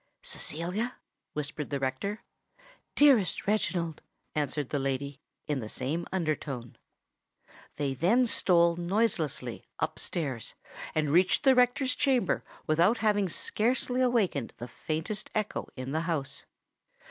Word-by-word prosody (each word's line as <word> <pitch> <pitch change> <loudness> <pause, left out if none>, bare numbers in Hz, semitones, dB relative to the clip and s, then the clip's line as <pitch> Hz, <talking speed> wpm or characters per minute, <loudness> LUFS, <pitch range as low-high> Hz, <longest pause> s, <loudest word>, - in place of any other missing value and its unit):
"Cecilia?" 180 - -2 0.4
whispered 150 0 -4
the 140 - -1
rector. 135 +11 -2 0.7
"Dearest 270 -10 +5
Reginald," 175 -6 0 0.3
answered 145 -2 -1
the 145 - 0
lady, 135 +1 -2 0.2
in 145 -2 -1
the 110 -3 -5
same 150 +10 -2
under 165 -5 +1
tone. 125 -5 -7 1.0
They 140 -2 -1
then 195 - +3
stole 170 -6 +3
noiselessly 175 - 0
up - - -2
stairs, 135 -9 -3 0.4
and 155 -2 +1
reached 180 - +4
the 270 -2 +7
rector's 250 +1 +3
chamber 255 -8 +2 0.2
without 170 +9 +4
having 205 -3 +2
scarcely 245 +7 0
awakened 210 - +1
the 120 - -6
faintest 160 - -3
echo 215 -1 -2
in 130 0 -5
the 160 +2 0
house. 160 -5 -2
170 Hz, 125 wpm, -29 LUFS, 145-215 Hz, 1.0 s, the